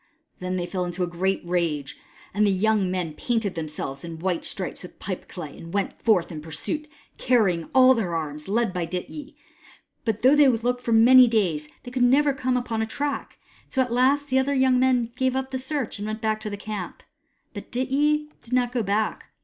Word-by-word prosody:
Then 185 Hz, 0 st, -3 dB
they 180 Hz, -1 st, -1 dB
fell 180 Hz, 0 st, -3 dB
into 175 Hz, +1 st, -2 dB
a -, -, 0 dB
great 185 Hz, +3 st, -1 dB
rage, 170 Hz, -5 st, -1 dB, 0.4 s
and 205 Hz, +2 st, +2 dB
the 205 Hz, -, +4 dB
young 200 Hz, 0 st, +2 dB
men 180 Hz, -4 st, -2 dB
painted 225 Hz, +2 st, -1 dB
themselves 155 Hz, -4 st, -5 dB
in 165 Hz, -1 st, -7 dB
white 175 Hz, 0 st, -1 dB
stripes 190 Hz, -, -4 dB
with 180 Hz, -, -11 dB
pipeclay, 175 Hz, -5 st, -6 dB
and 165 Hz, +3 st, -9 dB
went 200 Hz, -1 st, -2 dB
forth 200 Hz, -8 st, +2 dB
in 155 Hz, -2 st, -6 dB
pursuit, 165 Hz, -, -3 dB, 0.3 s
carrying 200 Hz, -10 st, +2 dB
all 260 Hz, 0 st, +8 dB
their 195 Hz, -9 st, -1 dB
arms, 150 Hz, -2 st, -4 dB
and 200 Hz, -, -3 dB
led 235 Hz, -5 st, +1 dB
by 175 Hz, -3 st, -2 dB
Dityi. 230 Hz, -, -6 dB, 0.7 s
But 225 Hz, -1 st, -2 dB
though 265 Hz, +3 st, +7 dB
they 295 Hz, -1 st, +6 dB
looked 245 Hz, 0 st, +1 dB
for 240 Hz, -, -3 dB
many 245 Hz, +3 st, +8 dB
days, 175 Hz, -10 st, 0 dB
they 245 Hz, -, -9 dB
could 255 Hz, 0 st, -2 dB
never 275 Hz, +4 st, +4 dB
come 255 Hz, -1 st, 0 dB
upon 235 Hz, -3 st, -2 dB
a 220 Hz, -, -1 dB
track; 285 Hz, +4 st, -4 dB, 0.3 s
and -, -, -18 dB
so 265 Hz, -, +3 dB
at 245 Hz, -2 st, -5 dB
last 275 Hz, +4 st, +2 dB
the 260 Hz, -, +3 dB
other 280 Hz, +2 st, 0 dB
young 260 Hz, -1 st, +3 dB
men 250 Hz, -2 st, +2 dB
gave 260 Hz, 0 st, +1 dB
up 265 Hz, 0 st, -2 dB
the 260 Hz, -, -2 dB
search, 265 Hz, -5 st, -3 dB
and 205 Hz, -, -4 dB
went 215 Hz, +1 st, -4 dB
back 220 Hz, -1 st, -1 dB
to 215 Hz, -, -4 dB
the 205 Hz, -, -5 dB
camp. 205 Hz, -2 st, -6 dB, 0.5 s
But -, -, -9 dB
Dityi 295 Hz, +4 st, +1 dB
did 240 Hz, -, -10 dB
not 250 Hz, -1 st, +2 dB
go 245 Hz, -1 st, 0 dB
back. 215 Hz, +1 st, -1 dB
220 Hz, 215 wpm, -25 LUFS, 180-255 Hz, 0.7 s, all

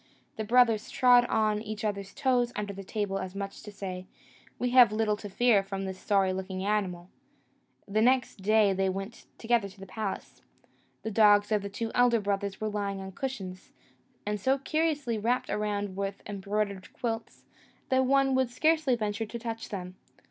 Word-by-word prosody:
The 220 Hz, -, -3 dB
brothers 230 Hz, -1 st, +3 dB
trod 245 Hz, -1 st, +5 dB
on 215 Hz, -2 st, +1 dB
each 215 Hz, 0 st, -5 dB
other's 200 Hz, -2 st, -3 dB
toes 245 Hz, -2 st, +1 dB
under 205 Hz, -1 st, -3 dB
the 195 Hz, 0 st, -8 dB
table, 195 Hz, -1 st, -2 dB
as 185 Hz, +1 st, -6 dB
much 195 Hz, 0 st, -5 dB
as -, -, -11 dB
to 210 Hz, -, -9 dB
say, 185 Hz, -2 st, -6 dB, 0.5 s
"We 245 Hz, 0 st, -1 dB
have 245 Hz, -4 st, +7 dB
little 215 Hz, -1 st, +1 dB
to 205 Hz, 0 st, -8 dB
fear 230 Hz, 0 st, +4 dB
from 195 Hz, 0 st, -5 dB
this 190 Hz, -1 st, -5 dB
sorry 195 Hz, -2 st, +2 dB
looking 190 Hz, 0 st, -4 dB
animal." 185 Hz, -4 st, -1 dB, 0.8 s
The 210 Hz, +2 st, +1 dB
next 250 Hz, +1 st, +2 dB
day 210 Hz, 0 st, +4 dB
they 190 Hz, 0 st, +1 dB
went 195 Hz, +4 st, -6 dB
together 230 Hz, -3 st, +1 dB
to 195 Hz, +1 st, -17 dB
the 195 Hz, -, -8 dB
palace. 200 Hz, +1 st, -5 dB, 0.6 s
The 220 Hz, -, -3 dB
dogs 205 Hz, 0 st, +5 dB
of 210 Hz, -1 st, +2 dB
the 200 Hz, -, -5 dB
two 225 Hz, +3 st, -4 dB
elder 245 Hz, -1 st, +4 dB
brothers 200 Hz, -1 st, -2 dB
were 215 Hz, -, -2 dB
lying 200 Hz, -2 st, -2 dB
on 190 Hz, 0 st, -7 dB
cushions, 195 Hz, -6 st, -6 dB, 0.5 s
and 210 Hz, 0 st, -2 dB
so 265 Hz, +5 st, +2 dB
curiously 290 Hz, -5 st, -1 dB
wrapped 240 Hz, +4 st, 0 dB
around 205 Hz, -2 st, -2 dB
with 195 Hz, 0 st, -4 dB
embroidered 200 Hz, -1 st, -3 dB
quilts, 225 Hz, -1 st, -4 dB, 0.4 s
that 260 Hz, 0 st, +3 dB
one 270 Hz, 0 st, +3 dB
would 260 Hz, -2 st, +2 dB
scarcely 310 Hz, +1 st, +2 dB
venture 215 Hz, -1 st, -2 dB
to 235 Hz, -, -6 dB
touch 230 Hz, -1 st, -5 dB
them. 180 Hz, -3 st, -5 dB
210 Hz, 180 wpm, -29 LUFS, 195-235 Hz, 0.8 s, have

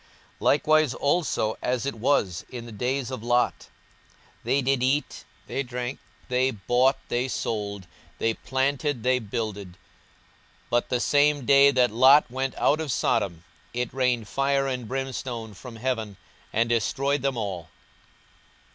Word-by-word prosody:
42:017:028 -, -, -29 dB, 0.3 s
Likewise 155 Hz, -2 st, +3 dB
also 140 Hz, -7 st, 0 dB
as 125 Hz, -1 st, -1 dB
it 140 Hz, -, -1 dB
was 110 Hz, -7 st, 0 dB
in 120 Hz, -2 st, -7 dB
the 120 Hz, -, -9 dB
days 125 Hz, +4 st, -2 dB
of 130 Hz, -, -5 dB
Lot; 120 Hz, +1 st, +1 dB, 0.8 s
they 140 Hz, -, +2 dB
did 135 Hz, 0 st, +1 dB
eat, 135 Hz, +3 st, 0 dB, 0.2 s
they 135 Hz, -, -2 dB
drank, 125 Hz, 0 st, -4 dB, 0.3 s
they 125 Hz, +1 st, +2 dB
bought, 125 Hz, +4 st, +2 dB
they 125 Hz, +2 st, 0 dB
sold, 100 Hz, -5 st, -3 dB, 0.3 s
they 115 Hz, -, +1 dB
planted, 135 Hz, 0 st, -1 dB
they 130 Hz, 0 st, +3 dB
builded; 105 Hz, -4 st, -4 dB
42:017:029 -, -, -24 dB, 0.9 s
But 120 Hz, 0 st, +1 dB
the 125 Hz, -, +1 dB
same 145 Hz, +1 st, +2 dB
day 140 Hz, +1 st, +7 dB
that 125 Hz, -4 st, +3 dB
Lot 130 Hz, +4 st, +6 dB
went 130 Hz, +1 st, -2 dB
out 155 Hz, +2 st, +2 dB
of 155 Hz, -4 st, -3 dB
Sodom 85 Hz, -7 st, 0 dB, 0.3 s
it 125 Hz, -1 st, -2 dB
rained 125 Hz, -4 st, 0 dB
fire 135 Hz, +2 st, +1 dB
and 125 Hz, -4 st, -3 dB
brimstone 125 Hz, -4 st, -4 dB
from 115 Hz, +4 st, -10 dB
heaven, 110 Hz, -4 st, -3 dB, 0.3 s
and 115 Hz, +2 st, +1 dB
destroyed 135 Hz, +5 st, 0 dB
them 135 Hz, -2 st, -1 dB
all. 95 Hz, -6 st, -4 dB
125 Hz, 145 wpm, -26 LUFS, 115-135 Hz, 0.9 s, day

